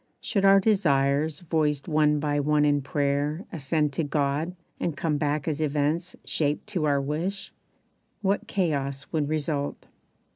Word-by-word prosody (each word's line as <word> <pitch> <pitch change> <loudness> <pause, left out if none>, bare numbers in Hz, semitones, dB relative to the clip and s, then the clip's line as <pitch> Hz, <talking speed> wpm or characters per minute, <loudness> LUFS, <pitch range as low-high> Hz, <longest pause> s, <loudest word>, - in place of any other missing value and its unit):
Should 200 -3 0
our 195 0 +7
desires 150 -7 +2
Voiced 155 -4 0
one 150 -2 +3
by 145 0 0
one 150 +1 +3
in 145 -1 +3
prayer 145 +4 -1
ascend 150 -1 0
to 165 - -1
God 145 +4 -1 0.2
And 160 -4 -2
come 155 -3 0
back 145 0 -1
as 155 -1 -1
events 155 +3 0
shaped 150 -1 -1
to 180 -7 -1
our 140 -1 +2
wish 165 +8 -3 0.7
What 200 +1 0
chaos 140 -7 -1
would 150 -3 0
result! 150 -2 -2
150 Hz, 145 wpm, -26 LUFS, 145-165 Hz, 0.7 s, our